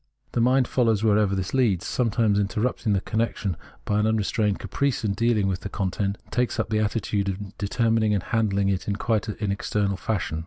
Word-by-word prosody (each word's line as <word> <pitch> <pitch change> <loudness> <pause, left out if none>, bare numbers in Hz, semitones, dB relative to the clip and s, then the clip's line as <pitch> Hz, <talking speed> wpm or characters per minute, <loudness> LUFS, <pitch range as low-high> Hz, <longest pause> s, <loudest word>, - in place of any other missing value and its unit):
The 120 - 0
mind 125 +1 +3
follows 115 -4 +2
wherever 105 -2 +3
this 95 -1 -3
leads, 115 -9 +2
sometimes 115 -4 +1
interrupting 105 +1 0
the 95 - +1
connection 110 -4 -1 0.3
by 105 - +1
an 105 - +2
unrestrained 105 -1 +1
caprice 140 -5 -1
in 100 - +1
deahng 115 -1 +2
with 95 -1 0
the 100 - -6
content, 100 0 -2
and - - -26
takes 125 -4 0
up - - -1
the 110 - +2
attitude 105 -2 0
of 100 +1 -6
determining 110 +1 +1
and 95 - -1
handhng 100 -3 +1
it 95 - -4
in 100 - 0
quite 110 0 0
an 105 -1 -2
external 100 0 -1
fashion. 90 -5 -2
105 Hz, 195 wpm, -25 LUFS, 100-115 Hz, 0.3 s, mind